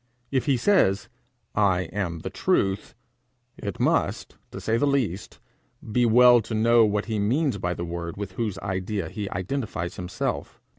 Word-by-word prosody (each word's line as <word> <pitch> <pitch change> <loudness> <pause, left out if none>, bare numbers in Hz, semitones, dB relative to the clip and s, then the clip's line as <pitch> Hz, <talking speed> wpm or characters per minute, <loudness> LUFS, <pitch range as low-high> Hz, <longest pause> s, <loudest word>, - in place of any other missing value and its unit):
If 135 +1 0
he 135 -3 +3
says, 115 - +2 0.4
'I 95 -3 +3
am 85 -5 -3
the - - -5
truth,' 95 +1 0 0.6
it 100 -3 -6
must, - - 0
to - - -8
say 110 - 0
the 130 +5 +2
least, 120 -9 -1 0.5
be 120 +2 +3
well 120 +1 +7
to 110 +1 -5
know 115 +1 +5
what 105 0 0
he 110 -2 -2
means 125 +3 +1
by 90 -1 -2
the 85 - -4
word 85 0 -5
with 100 -2 -5
whose 105 -1 -3
idea 95 -2 -3
he 100 +1 -5
identifies 95 -3 -3
himself. 90 -5 -4
105 Hz, 160 wpm, -25 LUFS, 95-115 Hz, 0.6 s, well